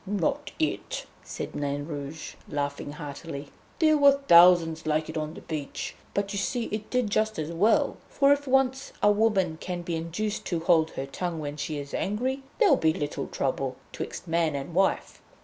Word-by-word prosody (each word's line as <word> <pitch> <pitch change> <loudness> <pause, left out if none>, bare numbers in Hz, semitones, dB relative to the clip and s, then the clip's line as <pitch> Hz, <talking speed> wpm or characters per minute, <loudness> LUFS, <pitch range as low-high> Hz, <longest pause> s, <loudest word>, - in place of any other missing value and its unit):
"Not 195 -4 -1
it," - - -2 0.2
said - - -6
Nain 145 0 -2
Rouge, 145 0 -6 0.2
laughing 145 0 -3
heartily, 145 -1 -7 0.3
"there 310 -1 +4
were 280 -1 +8
thousands 170 -3 +6
like 155 0 0
it 160 - -6
on 155 +1 -3
the - - -9
beach, 150 -3 -5 0.2
but 200 0 -1
you 200 - -1
see 215 +5 -1
it 215 0 -4
did 250 -5 0
just 215 +1 +1
as 155 +1 -3
well. 205 +7 +2
For 280 0 +4
if 285 0 -3
once 265 0 +1
a 205 - +7
woman 200 -6 +2
can 180 -1 -4
be 170 -1 -2
induced 170 +6 -3
to 170 -3 -1
hold 160 -1 +4
her 135 - -2
tongue 170 +4 -4
when 145 -2 -4
she 150 0 -3
is 140 -1 -7
angry, 255 +7 -1 0.2
there'll 435 -6 +5
be 160 -1 +3
little 145 -1 -3
trouble 135 -1 -2 0.2
'twixt - - -6
man 165 -2 +1
and 140 +4 -5
wife. 190 +3 +1
170 Hz, 185 wpm, -27 LUFS, 150-210 Hz, 0.3 s, were